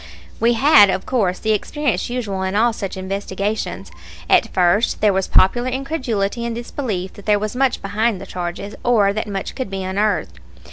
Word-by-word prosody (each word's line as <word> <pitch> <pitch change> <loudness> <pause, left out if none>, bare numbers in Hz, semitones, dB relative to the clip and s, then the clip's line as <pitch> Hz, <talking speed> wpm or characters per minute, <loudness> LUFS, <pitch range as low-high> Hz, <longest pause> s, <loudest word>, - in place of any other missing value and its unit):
We 235 +1 +3
had, 230 -5 +6
of 190 0 -1
course, 200 -8 0
the 220 - -1
experience 240 0 -1
usual 220 -6 -3
in 190 +1 -2
all 230 +2 +3
such 195 -3 -5
investigations. 195 +2 -3 0.4
At - - +3
first 185 +5 +2
there 210 -2 +3
was 190 0 0
popular 240 +7 +3
incredulity 255 -6 -2
and 235 -1 -3
disbelief 230 -6 -4
that 200 - -14
there 210 -1 +4
was 215 +3 -4
much 265 -1 +1
behind 210 +1 0
the - - -8
charges, 180 +3 -5
or 210 -5 +3
that 215 +1 -3
much 195 -2 -4
could 260 -6 -4
be 195 -1 -4
unearthed. 190 - -1
210 Hz, 180 wpm, -20 LUFS, 190-235 Hz, 0.4 s, had